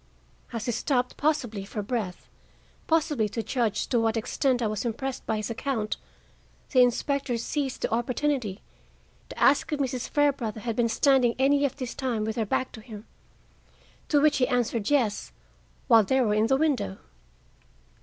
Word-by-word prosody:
As 230 -2 -4
he 240 - 0
stopped, 250 +2 0
possibly 245 -9 -1
for 205 +1 -5
breath, 205 -5 -4 0.6
possibly 300 -9 +1
to 225 +2 -3
judge 235 -5 0
to 240 - +2
what 225 0 +1
extent 245 +2 0
I - - +1
was 215 -1 -2
impressed 255 +3 -4
by 220 - 0
his 215 +2 -3
account, 230 -3 -2 0.7
the 255 - +5
inspector 255 +1 +1
seized 270 +3 -3
the - - 0
opportunity 240 -3 -1 0.7
to - - -10
ask 280 +3 +3
if 300 - -1
Mrs. 255 -3 -2
Fairbrother 270 -7 0
had 230 -1 -3
been 235 0 +2
standing 255 -1 +3
any 280 +2 +3
of 275 - -2
this 255 -4 -5
time 240 -5 -2
with 220 0 -3
her 225 -3 -1
back 260 - -1
to 220 - -10
him. 215 -2 -10 1.0
To 295 - +4
which 300 0 +4
he 250 - +2
answered 240 -4 0
yes, 245 -8 0 0.5
while 230 -3 +7
they 265 +6 +1
were 225 -5 +2
in 215 +1 +2
the 265 - +3
window. 275 - 0
245 Hz, 170 wpm, -27 LUFS, 220-275 Hz, 1.0 s, while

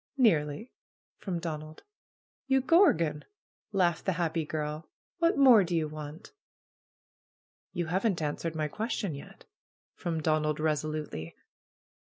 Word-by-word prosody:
"Nearly!" 180 - +2 0.5
from 185 -4 -3
Donald. 155 -2 -6 0.6
"You 265 0 +4
gorgon 170 - +4 0.3
!" - - -82
laughed 175 -5 +1
the 190 - +2
happy 165 -2 -1
girl. 150 0 -4 0.3
"What 335 -2 +3
more 255 -7 +8
do 175 -1 -2
you 160 -2 +1
want?" 155 +4 -9 1.4
"You 175 -2 -2
haven't 190 +3 0
answered 160 +2 -3
my 155 -1 0
question 210 - -3
yet," 140 - -11 0.5
from 165 -2 -3
Don 155 0 +1
ald 150 0 -1
resolutely. 155 - -2
160 Hz, 125 wpm, -30 LUFS, 155-195 Hz, 1.4 s, more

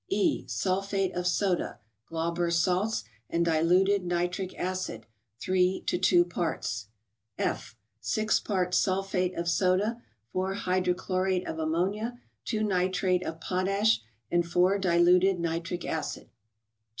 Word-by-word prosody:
E. 365 -4 +1
—Sulphate 195 0 -1
of 180 0 -1
soda 180 0 0 0.3
(Glauber's 170 +1 0
salts) 185 - +1 0.3
and 170 0 +1
diluted 180 +5 +3
ni¬ 175 0 0
tric 185 0 -5
acid, 185 -11 -3 0.3
3 185 0 +1
to 180 - 0
2 175 -1 +5
parts. 155 -11 -3 0.5
F. 120 - -2 0.2
—Six 215 - +1
parts 185 -3 +1
sulphate 185 -1 0
of 170 0 -2
soda, 185 +7 +1 0.3
4 190 +1 -1
hydrochlorate 185 0 0
of 160 - -4
am¬ 160 -1 -1
monia, 205 +9 -1 0.3
2 215 -2 -1
nitrate 185 -2 +1
of 160 -2 -5
potash, 195 - +1 0.3
and 175 -1 +1
4 180 +3 +3
diluted 180 +1 +4
nitric 170 +1 -3
acid. 155 -3 -4
180 Hz, 125 wpm, -28 LUFS, 170-195 Hz, 0.5 s, 2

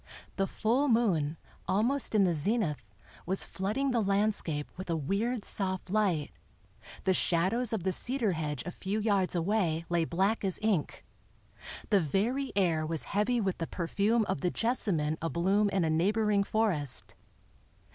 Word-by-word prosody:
The 195 -1 0
full 245 +9 0
moon, 180 - +1 0.3
almost 235 +5 +1
in 205 - +5
the 180 -2 +2
zenith, 165 0 0 0.4
was 190 +2 +2
flooding 215 +9 -2
the 235 -2 +1
landscape 200 -7 0
with 185 0 -8
a 165 - +1
weird, 200 - -2
soft 190 -2 -1
light; 190 -8 0 0.7
the 190 - +2
shadows 190 +8 +1
of 220 -6 -2
the 190 - 0
cedar 240 +1 +1
hedge 150 -5 -3
a 180 - -4
few 195 +4 -3
yards 200 -4 +1
away 170 -2 0
lay 170 -1 +1
black 195 +7 0
as 190 -2 +1
ink; 205 -9 -1 0.9
the 200 -2 +5
very 230 - -1
air 170 -5 +1
was 160 0 -2
heavy 220 +4 +1
with 195 -4 -2
the 165 - -3
perfume 205 +6 0
of 140 - -3
the 180 - +1
jessamine 175 -10 +1
abloom 190 +5 +1
in 190 -3 0
a - - 0
neighboring 205 +5 +2
forest. 190 - +1
195 Hz, 155 wpm, -30 LUFS, 170-215 Hz, 0.9 s, in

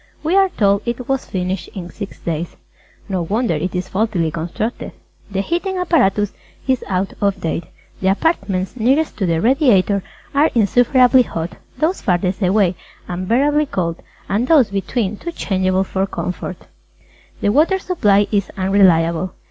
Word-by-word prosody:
We 325 +4 +1
are 390 -1 +5
told 200 - +2
it 240 +1 -3
was 270 -1 -1
finished 185 0 -3
in 180 -2 -6
six 200 -2 -7
days. 165 0 -4 0.5
No 190 -3 -1
wonder 210 +4 0
it 170 +4 -2
is 180 +1 -2
faultily 190 -6 0
constructed. 195 +8 -4 0.4
The 195 -1 -1
Heating 350 - -2
Apparatus 210 - +2 0.3
is 260 -2 +1
out 190 0 -1
of 200 -1 +1
date. 165 0 -2 0.4
The 190 - 0
apartments 195 - 0
nearest 265 +7 +1
to 195 - 0
the 165 -1 +1
Radiator 215 - +3 0.3
are 290 +3 +4
insufferably 245 +4 +5
hot, 165 -7 -4 0.2
those 330 +5 0
farthest 185 0 0
away 190 -1 +2 0.3
unbearably 255 +12 +1
cold, 170 -7 -2 0.3
and 220 +6 0
those 280 -10 +5
between 200 +1 -2
too 340 - -5
changeable 185 -4 0
for 190 0 -2
comfort. 180 -1 -4 0.8
The - - +1
Water 310 - +3
Supply 210 - +2
is 200 -3 0
unreliable. 185 -3 +3
200 Hz, 150 wpm, -19 LUFS, 185-255 Hz, 0.8 s, are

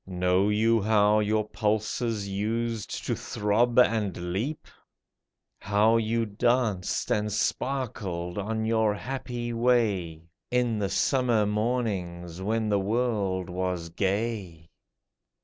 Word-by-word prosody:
Know 90 +2 +1
you 110 +2 +3
how 105 0 +4
your 105 0 +1
pulses 110 0 -1
used 110 +2 -3
to - - 0
throb 115 +4 0
and 105 -8 +2
leap? 130 +11 -3 0.9
How 105 +3 +3
you 115 +1 0
danced 110 -2 0
and 105 0 +1
sparkled 105 -7 -2
on 110 +2 -2
your 110 -2 +2
happy 120 0 -4
way. 105 -9 +1 0.3
In 120 -3 +1
the 100 -2 -1
summer 120 0 +2
mornings 100 -6 -2
when 110 +3 0
the 105 -1 +2
world 100 -4 0
was 90 -2 -3
gay 95 -3 -2
105 Hz, 110 wpm, -27 LUFS, 95-115 Hz, 0.9 s, how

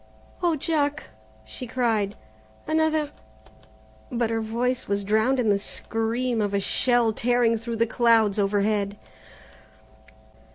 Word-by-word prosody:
"Oh, 345 -3 +2
Jack," 295 - -1 0.3
she 245 - -7
cried, 225 -5 0 0.5
"another 315 -1 +1 0.5
" 110 0 -28
but 230 -2 +1
her 225 0 0
voice 240 +3 -2
was 200 0 -1
drowned 220 +6 +2
in 230 -3 +1
the 200 -1 +3
scream 225 +3 -2
of 205 -1 -1
a - - +2
shell 240 +2 +2
tearing 235 0 +2
through 230 +1 -4
the 230 +1 +2
clouds 225 -3 +3
overhead. 205 0 0
225 Hz, 125 wpm, -25 LUFS, 205-250 Hz, 0.5 s, the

